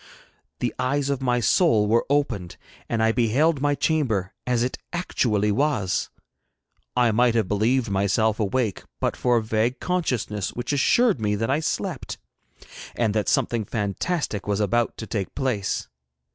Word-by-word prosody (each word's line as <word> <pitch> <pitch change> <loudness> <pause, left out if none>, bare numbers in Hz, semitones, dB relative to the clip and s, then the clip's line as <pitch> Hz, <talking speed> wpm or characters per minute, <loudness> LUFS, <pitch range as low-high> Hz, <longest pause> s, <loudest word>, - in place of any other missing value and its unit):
The - - 0
eyes 140 +2 0
of 135 -1 -2
my 125 -2 +1
soul 115 - +3
were 115 +3 +2
opened, 140 -11 -1 0.3
and 115 -1 +1
I 110 - +4
beheld 135 +7 +2
my 145 0 +2
chamber 120 - 0
as 120 -1 +2
it 125 - -3
actually 110 - 0
was. 110 -7 0 0.9
I 120 -2 +4
might 120 +2 +3
have 110 -4 +2
believed 115 +5 +1
myself 100 +3 +1
awake 110 0 0 0.2
but - - 0
for 120 -1 +2
a 115 - 0
vague 110 +3 0
consciousness 125 - -2
which 125 +3 -3
assured 200 - +3
me 105 -1 +1
that 115 +5 -1
I 145 - +2
slept, 160 - -3 0.8
and 110 -3 +1
that 105 -1 0
something 115 -2 +1
fantastic 105 - -2
was 100 0 0
about 115 +3 +1
to 110 - -6
take 100 -4 -4
place. 125 -8 -1
115 Hz, 155 wpm, -24 LUFS, 105-135 Hz, 0.9 s, I